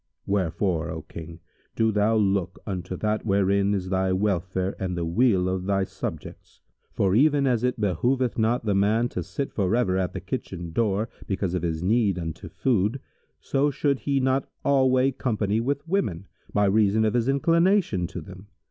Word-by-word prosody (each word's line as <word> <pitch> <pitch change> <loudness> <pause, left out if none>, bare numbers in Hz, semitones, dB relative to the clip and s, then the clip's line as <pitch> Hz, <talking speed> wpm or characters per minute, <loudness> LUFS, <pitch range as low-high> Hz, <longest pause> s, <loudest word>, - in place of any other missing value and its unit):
Wherefore, 90 -3 0
O 80 -2 -5
King, 85 0 -10 0.3
do 110 0 +2
thou 105 +2 +2
look 95 -4 +1
unto 95 -2 -4
that 110 0 -1
wherein 100 0 +2
is 95 -1 -3
thy 95 0 +1
welfare 95 -1 -1
and 90 -2 -3
the 85 - -1
weal 95 +1 +2
of 95 0 -2
thy 100 -1 +2
subjects; - - -7 0.3
for, 95 -1 +1
even 140 +4 +4
as 125 -3 +1
it 125 -1 0
behoveth 120 +6 +1
not 115 +1 0
a 100 - +3
man 105 +5 +2
to 90 - -4
sit 95 - -4
forever 100 -1 +1
at 90 -2 -2
the 95 - -4
kitchen 90 -4 -5
door, 105 +3 0 0.2
because 95 -2 -1
of 90 - -1
his 80 -1 -2
need 105 -1 +2
unto 80 -2 -6
food, 115 0 0 0.4
so 140 +1 +1
should 140 -1 0
he 140 -1 0
not 130 0 0 0.2
alway 130 -1 +3
company 110 -5 -1
with 140 +6 -2
women, 105 - -1 0.3
by 105 0 +2
reason 105 +2 +3
of 110 - +1
his 120 +1 +1
inclination 165 - +2
to 95 - -7
them. 95 +1 -12
100 Hz, 175 wpm, -25 LUFS, 95-125 Hz, 0.4 s, even